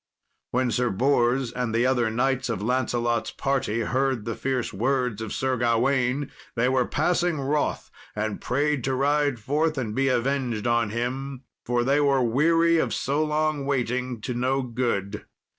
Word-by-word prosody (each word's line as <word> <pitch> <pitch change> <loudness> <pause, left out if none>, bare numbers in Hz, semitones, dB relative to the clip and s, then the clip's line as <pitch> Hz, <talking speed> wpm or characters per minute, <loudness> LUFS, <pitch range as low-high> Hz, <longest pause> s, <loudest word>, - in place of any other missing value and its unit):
When 125 0 0
Sir 125 +1 +1
Bors 125 +2 +2
and 125 -2 -2
the 120 +2 +3
other 125 -3 +2
knights 130 +3 0
of 110 -3 -2
Lancelot's 120 -1 0
party 135 -5 -1
heard 130 -2 0
the 115 - -2
fierce 130 0 -2
words 125 0 0
of 110 - -5
Sir 130 -1 -1
Gawain, 125 +3 +1 0.2
they 120 +1 +2
were 130 -1 +2
passing 175 -3 +1
wroth, 145 +2 -1 0.2
and 105 -1 -3
prayed 145 +1 0
to 135 -1 0
ride 145 0 +1
forth 150 +7 0
and 115 -5 -2
be 135 +3 +1
avenged 125 -3 0
on 120 -2 +2
him, 130 +4 -4 0.2
for 120 0 +1
they 140 +3 +2
were 140 -2 +3
weary 165 +7 +3
of - - 0
so 145 +3 0
long 155 -1 0
waiting 125 -3 -1
to 125 - -3
no 130 +2 0
good. 115 -5 -2
130 Hz, 160 wpm, -25 LUFS, 120-140 Hz, 0.2 s, the